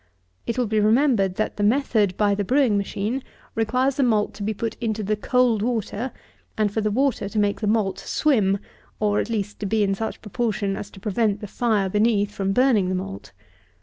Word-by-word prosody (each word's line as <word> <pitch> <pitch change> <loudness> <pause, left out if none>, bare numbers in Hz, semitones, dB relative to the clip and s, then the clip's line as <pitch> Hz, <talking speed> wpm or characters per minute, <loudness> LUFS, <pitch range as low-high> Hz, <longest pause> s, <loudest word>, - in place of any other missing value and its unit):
It 235 - -2
will 250 - +2
be 215 0 +1
remembered 215 -3 +3
that 215 - -2
the 205 - -1
method 215 -4 +2
by 205 -1 +3
the 205 0 -1
brewing 255 0 +3
machine 205 +5 -2 0.3
requires 250 +4 +1
the - - +2
malt 220 -5 +2
to - - -11
be 205 +2 -1
put 225 +2 -3
into 220 -2 -1
the 215 +2 0
cold 240 0 +2
water, 230 +1 -2 0.5
and 210 -2 +1
for 220 - 0
the 215 - +1
water 250 -2 0
to 215 - -6
make 205 -1 +1
the 210 - 0
malt 210 -3 +1
swim, 210 -10 +2 0.4
or, 210 -1 +2
at - - -2
least, 210 -3 -3
to 205 - -3
be 215 +1 +2
in 195 -1 +1
such 220 +3 -4
proportion 210 -3 -1
as 205 - -6
to 195 - -14
prevent 210 +1 0
the 210 - -6
fire 210 -2 0
beneath 210 +1 +2
from 195 -1 -2
burning 225 -5 +3
the 185 - 0
malt. 100 - -6
215 Hz, 210 wpm, -23 LUFS, 200-235 Hz, 0.5 s, remembered